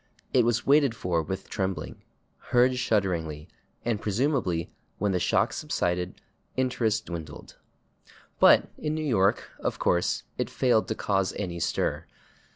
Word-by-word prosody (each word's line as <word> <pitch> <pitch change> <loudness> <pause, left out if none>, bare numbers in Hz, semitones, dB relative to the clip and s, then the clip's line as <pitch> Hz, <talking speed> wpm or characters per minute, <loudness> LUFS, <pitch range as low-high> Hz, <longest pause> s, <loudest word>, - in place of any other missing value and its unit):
It 125 -3 +5
was 120 -1 +1
waited 140 -4 +4
for 90 -6 0
with 95 +5 -5
trembling, 95 -5 -3 0.5
heard 125 +1 +4
shudderingly, 85 -10 -1 0.4
and 115 -3 0
presumably, 105 - 0 0.3
when 105 0 0
the 90 - +1
shock - - +2
subsided, 90 +1 -2 0.4
interest 115 -4 0
dwindled." 80 -3 -8 0.8
But - - +6
in 150 0 -2
New 155 0 -2
York, 100 -8 +2
of - - -2
course, 90 0 +1 0.2
it - - -1
failed 115 -6 +2
to - - -2
cause 95 -2 0
any 90 -4 -4
stir. - - -1
100 Hz, 135 wpm, -27 LUFS, 90-120 Hz, 0.8 s, But